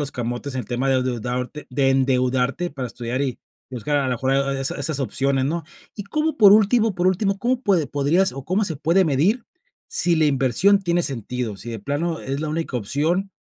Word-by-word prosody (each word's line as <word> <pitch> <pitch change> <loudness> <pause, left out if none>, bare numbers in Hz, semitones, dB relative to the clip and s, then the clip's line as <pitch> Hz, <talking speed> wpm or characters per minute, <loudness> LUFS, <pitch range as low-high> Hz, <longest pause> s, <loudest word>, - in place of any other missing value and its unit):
los 145 -1 -3
camotes 120 +3 -4
en 130 - -1
el 110 - -9
tema 125 +3 -1
de 130 -1 +2
deudarte 125 +3 -4
de 135 +1 +2
endeudarte 130 +3 +1
para 135 -3 -5
estudiar 120 +3 -4
y 130 -3 -2 0.3
buscar 130 +4 -2
a 140 - +2
la 130 - -1
mejor 130 +2 0 0.2
esa 135 0 -1
esas 140 0 -1
opciones, 135 0 0
¿no? 165 +2 -2 0.3
Y 205 - -6
cómo 305 +9 -1
por 205 -3 +8
último 215 0 +4
por 180 +1 0
último, 195 +2 +1
¿cómo 245 +4 0
puede 185 - +2
podrías 150 +7 +1
o 135 -1 -8
cómo 190 +5 +1
se 165 -5 -3
puede 165 +5 +2
medir 175 - +1 0.4
sí 175 - +2
la 160 -1 +3
inversión 140 - +3
tiene 175 -1 +1
sentido?, 125 -5 -3
sí 115 +5 -8
de 115 - -5
plano 155 +9 -2
es 135 +1 -4
la 155 - -3
única 160 -4 -3
opción 155 - -1
140 Hz, 205 wpm, -22 LUFS, 130-175 Hz, 0.4 s, por